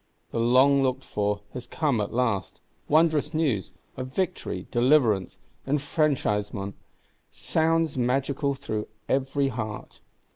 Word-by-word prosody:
The - - -2
long 130 +4 +5
looked 130 0 0
for 105 0 -1
has 125 -1 -7
come 140 -9 0
at 100 - -3
last; 115 -5 -1 0.3
wondrous 155 0 +3
news, 130 - 0 0.3
of 130 0 -5
Victory, 180 +7 -3
Deliverance, 120 -7 +3 0.3
Enfranchisement, 135 - 0 0.6
sounds 160 -3 0
magical 135 +3 0
through 110 -5 -4 0.2
every 135 +1 +1
heart. 110 -4 -6
130 Hz, 110 wpm, -26 LUFS, 110-145 Hz, 0.6 s, long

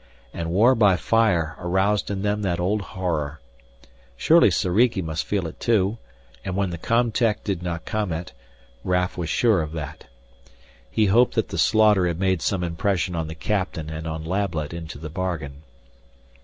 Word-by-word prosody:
And 85 -1 -4
war 110 +9 +5
by 105 -6 +4
fire 85 -3 +1
aroused 95 +3 +1
in 100 -1 -3
them 105 0 0
that 90 -4 -1
old 100 +4 0
horror. 80 -6 -3 0.8
Surely - - +5
Soriki 105 +4 +2
must 80 -3 -3
feel 100 -4 -1
it 80 - -8
too, 110 -1 +1 0.4
and 95 -1 -4
when 100 -2 0
the 85 - -6
com 115 +5 +1
tech 110 -1 0
did 95 -4 -2
not 85 -2 -4
comment, 90 -6 -3 0.5
Raf 90 0 0
was 85 -3 -4
sure 110 -4 +3
of 75 0 -5
that. 75 -1 -7 0.8
He 105 - +2
hoped 115 +5 +3
that 110 - 0
the - - -4
slaughter 105 -4 +4
had 85 -1 -2
made 95 -3 +1
some 90 +1 0
impression 90 +1 -1
on 80 -1 -2
the 80 - -7
captain 90 -4 -2
and 80 +1 -5
on 80 0 -4
Lablet 85 -4 -2
into 80 -3 -7
the 75 +1 -8
bargain. 80 -6 -4
90 Hz, 170 wpm, -23 LUFS, 80-105 Hz, 0.8 s, war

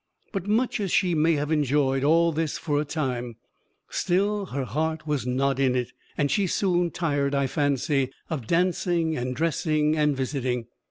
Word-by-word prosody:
But 195 -2 -3
much 225 +4 +1
as 195 -4 -2
she 180 -3 +2
may 160 +1 +3
have 150 0 -1
enjoyed 140 -3 +2
all 165 +3 +4
this 160 -1 -2
for 145 -2 0
a - - -3
time, 125 -6 -3 0.5
still 200 +2 0
her 140 -3 -3
heart 155 +6 -2
was 145 -5 -1
not 135 +1 +1
in 130 -2 +2
it, 125 -1 -2 0.2
and 145 -1 +1
she 200 -3 +2
soon 180 -1 +1
tired, 145 -5 0
I 140 0 +2
fancy, 140 -1 0 0.2
of 135 -9 -4
dancing 170 -2 +1
and 125 -1 -3
dressing 155 0 +1
and 150 -2 +2
visiting. 130 -3 -2
150 Hz, 170 wpm, -26 LUFS, 135-170 Hz, 0.5 s, all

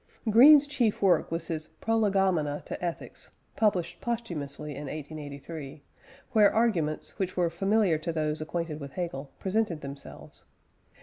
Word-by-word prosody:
Green's 285 +6 +8
chief 255 -7 0
work 190 -2 +3
was 165 0 -2
his 160 -2 -3
Prolegomena 195 -9 +1
to - - -6
Ethics 170 -1 -5 0.3
(published 205 -6 0
posthumously 155 -11 -4
in 145 +1 -6
1883), 145 0 -7 0.5
where 215 -4 +5
arguments, 180 -10 0
which 185 -1 -2
were 175 -2 +2
familiar 195 -1 +2
to 165 +2 -3
those 155 -1 -2
acquainted 160 -1 -3
with 140 -2 -8
Hegel, 150 -6 -4
presented 195 -5 -1
themselves. 140 0 -10
170 Hz, 130 wpm, -28 LUFS, 150-205 Hz, 0.5 s, Green's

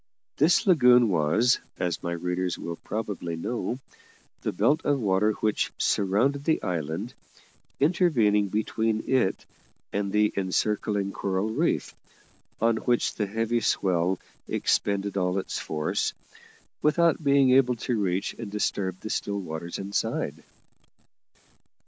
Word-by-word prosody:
This 160 - +4
lagoon 125 - +6
was, 95 +9 +3 0.2
as 90 -3 -2
my 85 - -3
readers 90 +1 -2
will 85 -1 -5
probably 100 -6 -4
know, 115 +7 -3 0.6
the - - -1
belt 155 +3 +2
of 145 -1 +1
water 105 0 +2
which 105 0 -1
surrounded 120 +9 +1
the 160 +1 +1
island, 85 - -3 0.7
intervening 135 - +3
between 110 +2 -1
it 130 -8 +1 0.5
and 100 -1 -1
the 105 +1 +2
encircling 100 +1 0
coral 95 +2 -1
reef, - - 0 0.7
on 115 0 +2
which 120 +1 +1
the 105 - -2
heavy 115 +3 0
swell 95 -4 +1 0.3
expended 100 0 0
all 90 0 0
its 95 - -3
force, 75 -1 -1 0.7
without 165 +1 +3
being 140 -2 +4
able 125 -1 +4
to 120 +1 -2
reach 95 0 -1
and 115 - -5
disturb 95 -3 -2
the 110 - -6
still 100 0 -2
water 85 -2 -6
inside. 100 +1 -2
105 Hz, 125 wpm, -26 LUFS, 95-120 Hz, 0.7 s, lagoon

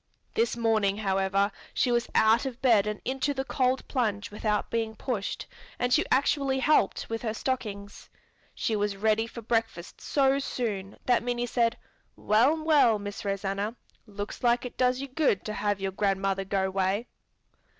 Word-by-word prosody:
This 450 - +1
morning, 215 -4 +2
however, 195 0 +1 0.2
she 250 - +2
was 240 0 +1
out 225 +4 +4
of 250 -2 -7
bed 225 -6 +4
and 210 0 -3
into 270 +2 -1
the 265 - -1
cold 260 -1 0
plunge 215 -5 -1
without 210 0 -1
being 225 -1 -1
pushed 220 -4 -3 0.3
and 245 0 +1
she - - +4
actually 275 0 +2
helped 265 -6 +2
with 225 0 -4
her 220 -2 -2
stockings. 210 -6 -4 0.5
She 220 - -1
was 205 -1 -1
ready 220 +2 +2
for 235 0 -9
breakfast 225 -6 -2
so 275 -1 +2
soon 205 -8 -3
that 245 -2 +3
Minnie 245 0 -1
said, 235 -1 +1 0.4
"Well, 265 +9 +2
well, 290 -8 +5
Miss 205 +2 -6
Rosanna, 200 +2 -2 0.3
looks 205 0 -6
like 240 +1 +3
it 250 - -7
does 255 0 +1
you 275 - -4
good 270 -7 +1
to 215 - -3
have 205 -1 -1
your 195 0 -2
grandmother 195 0 0
go 190 -1 0
'way!" 195 +4 0
225 Hz, 165 wpm, -28 LUFS, 200-250 Hz, 0.5 s, well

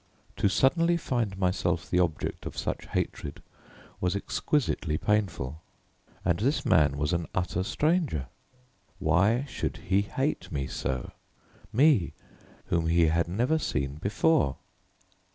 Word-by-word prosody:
To 100 - +3
suddenly 170 - +3
find 120 - -1
myself 90 -2 0
the 90 - +1
object 85 -4 -1
of - - -8
such - - -3
hatred 70 -2 -3 0.6
was 90 +1 0
exquisitely 100 - 0
painful: 95 -9 -1 0.6
and 85 -1 +2
this 135 +8 +1
man 75 -6 +4
was 75 +4 0
an 85 -1 -1
utter 90 -1 0
stranger. 150 - 0 0.7
Why 100 - +2
should - - -3
he 95 +2 +1
hate 135 +8 -2
me 70 -4 -2
so? 65 -1 -3 0.6
me, 130 - +4 0.5
whom 85 -2 0
he 85 -1 +4
had 85 +1 +1
never 120 - +1
seen 70 - -2
before? 105 - +2
90 Hz, 125 wpm, -28 LUFS, 80-125 Hz, 0.7 s, man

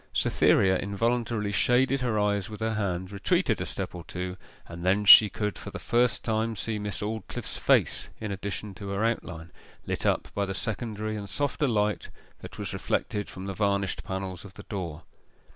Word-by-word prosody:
Cytherea 95 -1 +3
involuntarily 115 +1 0
shaded 130 +6 +3
her 120 -4 0
eyes 100 -2 +1
with 105 - -8
her 110 0 0
hand, 95 -3 -2
retreated 100 -1 +1
a - - -2
step - - -4
or 85 -1 -7
two, 90 0 -4 0.3
and 85 0 -9
then 100 +3 +2
she 105 0 +10
could 105 -2 -3
for - - -7
the - - -6
first 120 +1 +1
time 110 0 0
see 110 +1 -2
Miss 105 -2 -4
Aldclyffe's 110 +1 -4
face - - +2
in 105 -2 -4
addition 100 +1 -4
to 100 +2 -8
her 100 +3 0
outline, 85 -7 -3 0.3
lit - - -1
up - - +1
by 100 -1 -1
the 95 - -3
secondary 110 +1 -3
and 100 -2 -6
softer 145 +4 0
light 105 -3 0 0.3
that - - -10
was - - -4
reflected 105 -1 -2
from 95 0 -8
the 100 - -3
varnished 100 -1 0
panels 95 -2 -5
of 100 -1 -12
the - - -10
door. 85 -6 -5
105 Hz, 185 wpm, -28 LUFS, 95-110 Hz, 0.3 s, she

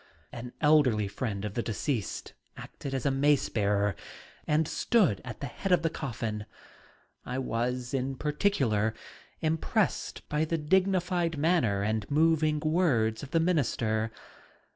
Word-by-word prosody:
An 120 +1 -7
elderly 140 -9 +4
friend 105 0 -3
of 105 - -4
the 120 - -1
deceased 115 +1 -3 0.2
acted 135 -1 -6
as 130 - -3
mace 140 +1 +3
bearer 100 -2 +1 0.5
and 155 0 +2
stood 170 - +2
at - - -8
the - - -2
head 185 +8 -4
of 175 -2 +4
the 165 - +1
coffin. 110 -7 -4 0.8
I 125 - -4
was 125 0 -2 0.2
particularly 130 - +1 0.5
impressed 160 0 -1
by 150 +1 0
the 165 +1 0
dignified 180 0 +1
manner 145 - +2
and 110 -1 -1
moving 155 0 +3
words 145 -10 +2
of 140 - -8
the 165 - +2
minister. 115 -10 +1
140 Hz, 130 wpm, -29 LUFS, 110-160 Hz, 0.8 s, elderly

